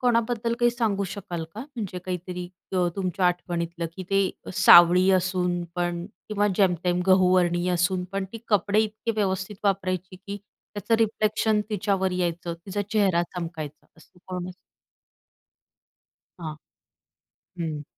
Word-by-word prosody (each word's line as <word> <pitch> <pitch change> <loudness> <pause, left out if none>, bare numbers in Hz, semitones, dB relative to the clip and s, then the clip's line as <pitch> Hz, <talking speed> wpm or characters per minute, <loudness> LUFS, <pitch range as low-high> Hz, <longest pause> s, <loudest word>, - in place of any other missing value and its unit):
कोणाबद्दल 235 -1 +1
काही 240 0 +5
सांगू 215 -5 0
शकाल 180 -4 -5
का? 220 - -6 0.2
म्हणजे 195 -5 -4
काहीतरी 180 0 -5 0.3
ग 180 -1 +3
तुमच्या 185 -1 0
आठवणीतलं, 170 -1 -2
की 185 - -5
ते 195 -1 +3 0.2
अ, - - -5
सावळी 175 +2 +8
असून 180 -1 -1
पण 175 -1 -1 0.2
किंवा 205 -1 +1
जेमतेम 180 -2 +2
गहूवर्णीय 180 -2 +4
असून 180 +1 +1
पण. 195 -1 -1
ती 230 - -6
कपडे 205 0 +3
इतके 220 +1 -2
व्यवस्थित 195 0 -1
वापरायची 185 -2 -1
की 200 +2 -7 0.4
त्याचं 205 +3 0
रिफ्लेक्शन 215 -1 +2
तिच्यावर 195 -2 0
यायचं. 175 -1 -2
तिचा 205 +1 -2
चेहरा 195 -6 +3
चमकायचा 160 -4 -6
अशी 165 +2 -21
कोण 180 -1 -4 1.9
हां. 160 -3 -5 1.0
हं. 155 -3 -3
185 Hz, 125 wpm, -25 LUFS, 175-205 Hz, 1.9 s, सावळी